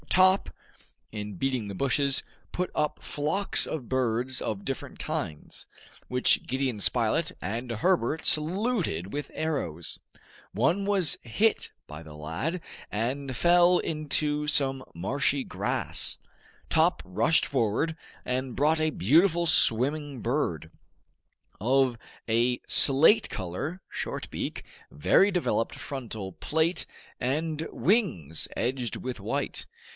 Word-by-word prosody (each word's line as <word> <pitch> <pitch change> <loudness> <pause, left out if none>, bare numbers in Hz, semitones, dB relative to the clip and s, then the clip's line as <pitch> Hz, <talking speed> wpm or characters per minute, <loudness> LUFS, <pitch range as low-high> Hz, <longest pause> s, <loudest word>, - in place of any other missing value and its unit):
Top, 185 +1 +5 0.6
in 105 -2 -5
beating 125 +1 -1
the 100 - -5
bushes, 140 +4 +1 0.3
put 180 0 -2
up 150 -1 -1
flocks 155 +7 +1
of 140 -7 -5
birds 130 0 0
of 100 -2 -3
different 135 - -5
kinds, 75 -1 -5 0.4
which 125 0 +3
Gideon 130 -4 -1
Spilett - - +1
and 115 +6 -3
Herbert 155 - +1
saluted 165 - 0
with 145 0 -4
arrows. 85 - -3 0.5
One 170 - +2
was 195 -6 +3
hit 205 - +1 0.2
by 75 +2 -8
the 80 -2 -11
lad, 80 - -3 0.3
and 130 +5 -2
fell 175 +4 +5
into 150 -1 -1
some 135 -3 +2
marshy 135 +9 0
grass. - - -3 0.5
Top - - +3
rushed 110 - +2
forward, 135 +5 0 0.3
and 130 0 -2
brought 155 +2 +3
a 155 - +3
beautiful 165 - +3
swimming 145 -1 +2
bird, 90 - -1 0.9
of 130 +1 +3 0.3
a 120 +2 +2
slate 160 +11 +5
color, 140 - -4
short - - -4
beak, - - -4 0.3
very 195 - +4
developed 140 - 0
frontal 110 -8 -6
plate, 160 - 0 0.3
and 155 +5 -1
wings 165 - 0
edged 125 -1 -1
with 130 -1 -5
white. - - -3
135 Hz, 115 wpm, -28 LUFS, 115-160 Hz, 0.9 s, Top